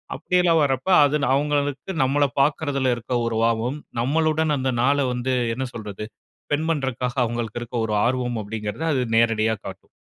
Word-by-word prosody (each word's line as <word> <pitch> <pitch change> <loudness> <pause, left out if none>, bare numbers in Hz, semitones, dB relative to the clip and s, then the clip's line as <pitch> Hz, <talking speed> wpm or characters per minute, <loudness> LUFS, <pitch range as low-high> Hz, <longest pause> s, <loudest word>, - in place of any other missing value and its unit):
அப்படியெல்லாம் 175 -3 +2
வரப்ப 135 +5 -1 0.2
அது 145 +1 +1 0.2
அவங்களுக்கு 145 +3 -1
நம்பள 145 +2 +2 0.2
பாக்குறதுல 140 -3 +1
இருக்குற 120 +1 -3
ஒரு 115 -1 -2
ஆர்வம் 115 +5 0 0.2
நம்பளுடன் 155 +2 +1
அந்த 130 0 0
நாள 140 +2 +3 0.2
வந்து, 125 +1 -1 0.2
என்ன 130 +1 -3
சொல்றது? 105 -2 -6 0.4
ஸ்பெண்ட் 155 +2 -1
பண்ணுறக்காக, 130 -4 -2
அவங்களுக்கு 120 -1 -4
இருக்குற 120 -1 -3
ஒரு 105 - -1
ஆர்வம் 125 -2 -1
அப்டீங்கிறத 105 +5 -5
அது 130 - +1 0.2
நேரடியா 110 -1 +2
காட்டும். - - -9
130 Hz, 150 wpm, -23 LUFS, 115-145 Hz, 0.4 s, நாள